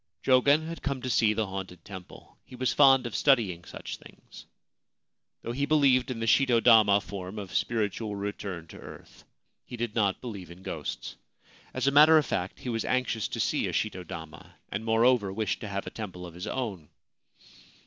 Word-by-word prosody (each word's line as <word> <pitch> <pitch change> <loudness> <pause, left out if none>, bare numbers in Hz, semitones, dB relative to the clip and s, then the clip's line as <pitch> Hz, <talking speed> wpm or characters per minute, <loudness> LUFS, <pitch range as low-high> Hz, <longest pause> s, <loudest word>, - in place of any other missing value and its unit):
Jogen 140 +4 +4
had 165 +1 -7
come 140 -2 -2
to 130 - -2
see 110 -2 +3
the 110 0 0
haunted 95 -3 -7
temple. 95 -3 -11
He 130 - -13
was 130 0 0
fond 135 -3 +6
of 120 - -5
studying 110 -12 +2
such - - -8
things. - - -15 1.0
Though 115 - -4
he 140 +4 -1
believed 135 -5 +3
in 125 -3 -4
the 115 - -2
shito 120 +1 +4
dama 110 -4 +6
form 95 0 -7
of 100 -3 -7
spiritual 110 -2 -1
return 100 -4 -5
to - - -11
earth, - - -13 0.4
he 120 - -9
did 120 -2 -3
not 100 -4 +1
believe 100 -8 -8
in 90 +2 -13
ghosts. - - -6 0.5
As - - -2
a 140 - +4
matter 155 +3 +7
of 155 - +3
fact, 90 -4 -3
he 125 - -5
was 115 -1 -1
anxious 125 -4 -1
to - - -6
see - - 0
a - - -4
shito 95 -4 -2
dama, 80 -2 -10
and, 100 +3 -4
moreover, 115 -2 +3
wished 105 0 -2
to 105 - -6
have 100 -1 -4
a - - -6
temple 95 -5 -7
of 85 - -10
his 90 +2 -7
own. 100 - -4
110 Hz, 190 wpm, -28 LUFS, 95-130 Hz, 1.0 s, matter